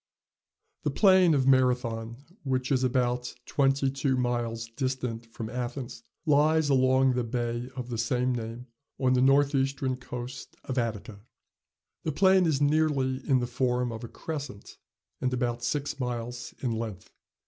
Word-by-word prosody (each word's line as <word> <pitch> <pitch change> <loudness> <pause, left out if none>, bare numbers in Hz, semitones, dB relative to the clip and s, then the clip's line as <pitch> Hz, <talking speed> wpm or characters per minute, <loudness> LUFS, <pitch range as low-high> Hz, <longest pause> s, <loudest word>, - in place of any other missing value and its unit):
The - - 0
plain 185 -5 +5
of 135 -2 +2
Marathon, 125 -3 +2 0.2
which 130 -2 -1
is 130 -1 +2
about 125 -1 0
twenty 135 -1 +2
two 135 -1 0
miles 120 -2 -1
distant 125 -2 -3
from 115 -1 -6
Athens, 125 +2 -5 0.2
lies 155 0 +3
along 130 -1 +4
the 125 0 0
bay 120 +1 -3
of 125 -2 -5
the 115 -2 -3
same 125 +2 +1
name 115 +1 -5 0.3
on 130 -1 +2
the 125 - +3
north 140 +2 +4
eastern 135 -1 0
coast 125 0 -7
of 130 -1 -2
Attica. 110 -3 -4 0.8
The 160 - -2
plain 190 +2 +5
is 150 -4 +1
nearly 145 -3 +2
in 130 -2 +4
the - - 0
form 125 0 0
of 115 +1 -7
a - - -5
crescent, 140 -7 -7 0.4
and 130 - 0
about 120 -1 -1
six 140 +4 -2
miles 120 -1 -4
in 125 - 0
length. 110 -5 -5
125 Hz, 150 wpm, -28 LUFS, 120-135 Hz, 0.8 s, plain